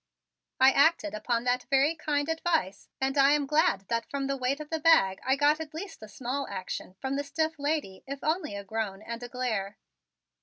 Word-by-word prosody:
I 260 +1 +7
acted 315 +2 +3
upon 230 +2 -1
that 250 0 0
very 280 +3 +4
kind 295 -2 -1
advice 325 - -1
and 270 +1 0
I 275 +1 +6
am 295 -1 +1
glad 300 - +2
that 230 0 -1
from 280 -1 -2
the 275 0 -1
weight 265 +2 -1
of 305 0 -9
the 320 - -1
bag 295 - +4
I 265 - +2
got 290 +2 +3
at 310 -1 -7
least 385 - -7
a 215 - -9
small 265 +5 -3
action 185 -1 -6
from 270 +1 -2
the 285 - -1
stiff 315 +2 -2
lady 285 -10 -2
if 275 0 -6
only 315 - -1
a 200 - -5
groan 210 -1 -4
and 235 +1 -6
a 245 - -7
glare. 220 -6 -2
275 Hz, 205 wpm, -28 LUFS, 230-305 Hz, -, I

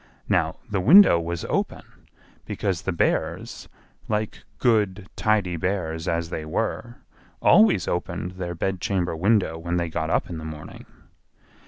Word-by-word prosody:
Now - - +1
the 100 - -1
window 160 - +7
was 85 0 -4
open, - - -4 0.4
because 95 -3 -2
the 95 - -2
Bears, 85 - -2 0.4
like 105 0 -3
good, 105 -5 +1
tidy 100 -5 +1
bears 80 -2 -2
as 85 0 -1
they 80 - -4
were, 120 +9 -3 0.4
always 110 -4 +5
opened 85 0 -3
their 90 -2 -5
bedchamber 90 -1 -1
window 95 -2 +1
when 85 +1 -2
they 85 -1 -1
got 80 -1 -3
up - - +1
in 85 -2 -6
the - - -8
morning. 80 -1 -9
90 Hz, 140 wpm, -24 LUFS, 85-100 Hz, 0.4 s, window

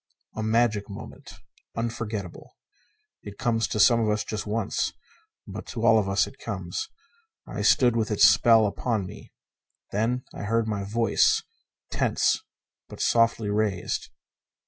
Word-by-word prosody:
A 110 - -3
magic 110 -2 +1
moment. 100 - -10 0.4
Unforgettable. 110 -5 -5 0.6
It 100 -1 -10
comes 115 -3 0
to 105 - -3
some 115 +2 +6
of 110 -2 +1
us 105 0 0
just 110 -1 -5
once, 105 0 -1 0.5
but - - -8
to - - -3
all 110 - +6
of 100 -2 -1
us 100 +1 +2
it 135 - -13
comes. 95 - -5 0.6
I - - -5
stood 120 -3 +4
with 110 -2 0
its 105 - +2
spell 115 -2 +5
upon 105 0 -1
me. 105 +3 -11 0.6
Then 115 +5 0
I - - -6
heard 115 +1 +1
my 105 -2 -2
voice, 115 +3 +2 0.5
tense - - +1 0.5
but - - -11
softly 115 -2 +2
raised. 105 -4 -1
110 Hz, 145 wpm, -26 LUFS, 105-115 Hz, 0.6 s, some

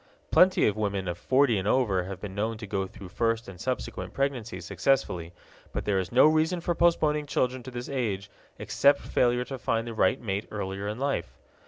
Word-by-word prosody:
Plenty 185 +1 +5
of 105 - +2
women 100 -3 -2
of 85 - -2
forty 130 -5 +3
and 95 - -3
over 105 -8 +2
have 95 0 -6
been 100 -1 -7
known 110 +3 -2
to 110 - -7
go 95 -1 -2
through 95 0 -11
first 115 +3 0
and 90 -3 -10
subsequent 130 -1 -4
pregnancies 120 -10 -2
successfully, 95 -4 0 0.4
but - - -3
there 100 -2 +2
is 95 - -4
no 125 +4 +6
reason 160 +3 +3
for 175 +1 -1
postponing 155 -3 +2
children 130 -2 0
to 130 - -8
this 120 0 -6
age 110 -8 -2 0.3
except 140 0 +3
failure 125 0 +1
to 135 +1 -6
find 115 -1 0
the 115 - -5
right 110 - +2
mate 100 -2 -3
earlier 100 -1 -4
in 105 +1 -3
life. 125 - -2
115 Hz, 200 wpm, -27 LUFS, 100-135 Hz, 0.4 s, no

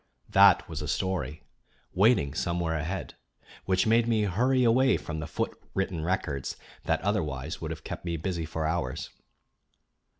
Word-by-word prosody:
That - - +6
was 80 -2 -5
a 75 - -4
story, 90 -3 -2 0.5
waiting 95 - +3
somewhere 85 +1 -1
ahead, 80 +5 -3 0.5
which 95 -1 +2
made 115 +1 +4
me 110 -2 +2
hurry 125 +7 +2
away 130 +3 +4
from 80 -2 -5
the 80 - -4
foot 75 - -2 0.2
written 95 -4 -1
records 80 -6 -2 0.3
that - - +1
otherwise 80 -7 -2
would 80 - -4
have 80 -3 -6
kept - - -6
me 85 -1 -2
busy 85 -1 -3
for 80 0 -3
hours. 80 -5 -2
85 Hz, 155 wpm, -28 LUFS, 80-100 Hz, 0.5 s, That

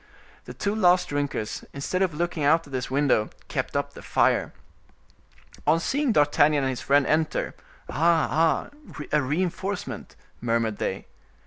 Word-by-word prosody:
The - - -9
two 200 0 -1
last 180 -4 +3
drinkers, 145 -7 -3
instead 140 +7 -2
of 180 -5 +1
looking 170 -1 -2
out 160 +3 +4
at 140 - -14
this 125 -1 -2
window, 135 -5 +2 0.2
kept - - -2
up - - -2
the - - -11
fire. - - +2 1.2
On 165 - +4
seeing 275 - 0
D'Artagnan 145 -3 +3
and 130 - +1
his 125 - -5
friend 140 0 +3
enter:—"Ah! 155 0 -2
ah! 165 0 +2 0.4
a 150 - +3
reinforcement," 180 +7 -3 0.3
murmured 115 -2 0
they. - - -3
150 Hz, 140 wpm, -25 LUFS, 140-175 Hz, 1.2 s, out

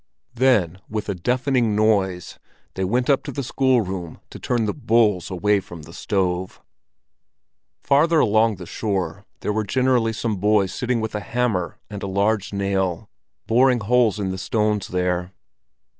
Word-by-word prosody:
Then 115 -9 +2
with, 105 -1 -4
a - - 0
deafening 125 +3 0
noise 100 -4 0 0.3
they 95 - -3
went 120 +7 0
up 140 -1 +3
to - - -4
the 140 - -4
schoolroom 110 -10 0
to - - -9
turn 120 -3 0
the 105 - -1
"bulls" 110 - +2
away 100 +2 +1
from 85 -4 -11
the 80 +2 -13
stove. 95 -2 -2 1.2
Farther 155 +4 +3
along 110 -2 +3
the 90 -1 -9
shore, 100 -1 -3 0.2
there 105 - -1
were 110 +1 0
generally 125 +1 +1
some 110 -2 -2
boys 100 -1 +2
sitting 125 -3 -1
with 110 - -4
a 105 - -2
hammer 105 -7 -1
and 100 -1 -7
a - - -4
large 100 +1 0
nail, 95 -3 -2 0.3
boring 125 +1 +3
holes 115 -1 +2
in 95 -2 -2
the 95 - -5
stones 105 -1 0
there. 90 0 -1
105 Hz, 160 wpm, -22 LUFS, 95-120 Hz, 1.2 s, up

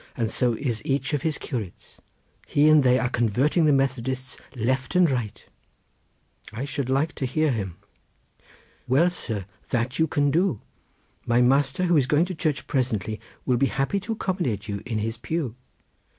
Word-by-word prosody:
and 115 -2 -1
so 125 0 +1
is 115 -2 -2
each 135 +2 -1
of 145 - 0
his 160 -2 -1
curates; 110 - -7 0.5
he 145 +1 +3
and 155 -1 +7
they 125 -1 +4
are 130 - +1
convarting 125 - +2
the 150 - +5
Methodists 130 -1 -1 0.2
left 130 - -1
and 180 -4 +5
right." 115 -5 -3 1.1
"I 115 +5 -4
should 140 -2 -3
like 135 +4 +1
to 130 - -3
hear 155 +3 +1
him." 95 -7 -3 1.1
"Well, 160 +8 +4
sir! 110 - -4 0.2
that 125 +3 -1
you 160 - +4
can 145 -1 +1
do. 170 - +1 0.7
My 120 0 +3
master, 135 +6 +2
who 175 -2 +3
is 135 -3 +3
going 150 +4 +3
to 185 - -5
church 155 -4 -1
presently, 110 -5 -1 0.2
will 125 -2 +2
be 135 - +3
happy 135 +10 0
to 215 +4 -4
accommodate 170 - -2
you 100 -1 -4
in 115 -3 -2
his 110 +2 -2
pew." 145 -1 -3
130 Hz, 170 wpm, -25 LUFS, 120-150 Hz, 1.1 s, and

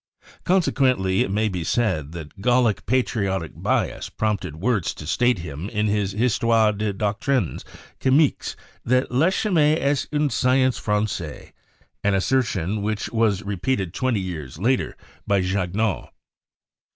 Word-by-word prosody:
Consequently, 130 - +2
it - - 0
may 105 +3 +1
be 90 -5 -3
said 85 -8 0
that 80 +2 -9
Gallic 120 -3 +2
patriotic 100 - 0
bias - - -1
prompted 100 -7 -2
Wurtz 100 +1 0
to 75 - -9
state 100 +2 +1
in 80 +5 -6
his 105 -3 0
"Histoire 115 0 +3
des 105 0 -1
Doctrines 105 - -1 0.4
Chimiques" 140 +3 +2 0.3
that 125 +2 +1
"La 135 +7 +3
chimie 165 -6 +2
est 140 0 0
une 150 -1 +1
science 130 -1 +2
franchise" 105 -7 -2 0.3
— - - -38
an 100 -1 +2
assertion 105 -3 0
which 105 +1 -2
was 110 -3 +1
repeated 100 -1 -2
twenty 130 -5 0
years 75 -8 -6
later 120 +8 0 0.3
by 100 -1 +3
Jagnaux. 95 +2 -1
105 Hz, 130 wpm, -23 LUFS, 95-125 Hz, 0.4 s, Histoire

